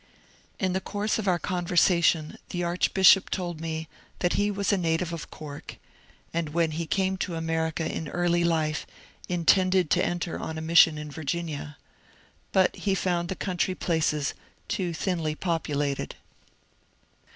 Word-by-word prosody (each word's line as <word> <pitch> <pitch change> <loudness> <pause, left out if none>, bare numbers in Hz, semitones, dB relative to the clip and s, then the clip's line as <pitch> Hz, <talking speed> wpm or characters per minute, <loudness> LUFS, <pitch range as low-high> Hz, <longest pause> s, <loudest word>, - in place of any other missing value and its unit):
In 185 -2 0
the 190 - 0
course 210 +3 -1
of 205 - -3
our 180 -2 +3
conversation 175 -3 +2
the 175 -1 -2
archbishop 185 +2 +4
told 175 -3 -3
me 160 -1 -4 0.3
that 175 - +1
he 205 0 +2
was 200 0 0
a - - +3
native 170 0 0
of 165 - -6
Cork, 145 -2 -9 0.6
and 165 -2 -1
when 165 -2 +2
he 165 +1 -3
came 190 +2 0
to 180 -2 -3
America 160 0 -1
in 160 - -3
early 175 +2 +1
life 160 -2 0 0.4
intended 180 0 +3
to - - +3
enter 175 -1 -2
on 160 0 -5
a - - -4
mission 165 -1 +6
in 150 -1 -6
Virginia. 155 -1 -4 0.7
But 190 -1 +3
he 195 -2 0
found 175 -2 0
the 190 - -2
country 185 0 -1
places 155 -5 0 0.3
too 180 -3 -1
thinly 165 -2 -1
populated. 145 -5 -2
170 Hz, 150 wpm, -27 LUFS, 160-185 Hz, 0.7 s, mission